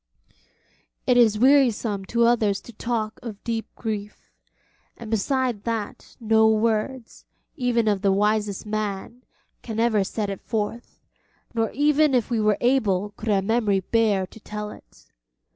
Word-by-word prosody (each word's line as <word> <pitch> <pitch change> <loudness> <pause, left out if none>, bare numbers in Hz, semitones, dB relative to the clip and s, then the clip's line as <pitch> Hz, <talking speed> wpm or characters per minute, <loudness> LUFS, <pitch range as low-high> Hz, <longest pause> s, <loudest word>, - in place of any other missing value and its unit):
It 250 - +3
is 225 -3 +5
wearisome 235 -6 +3
to 235 +3 +2
others 220 -4 +2
to 235 - -13
talk 220 -1 -3
of 220 -4 -8
deep 225 -1 -3
grief, 210 -2 -6 0.7
and 225 -2 -9
beside 245 0 0
that 230 +1 -5
no 220 -1 +4
words, 225 +3 -1 0.3
even 245 -5 +1
of 205 -2 +1
the 200 -1 +3
wisest 210 0 0
man, 215 +2 -4 0.4
can 225 -2 -5
ever 225 -3 +3
set 205 +1 -3
it 195 - -7
forth, 225 +1 -4 0.5
nor 225 -2 0
even 295 +1 +3
if 245 -1 0
we 230 -2 +1
were 210 -1 +2
able 210 -6 +1
could 220 +2 -6
our 195 -2 +2
memory 210 -2 +1
bear 210 -2 +1
to 205 - -15
tell 210 0 -6
it. - - -17
220 Hz, 145 wpm, -24 LUFS, 210-235 Hz, 0.7 s, is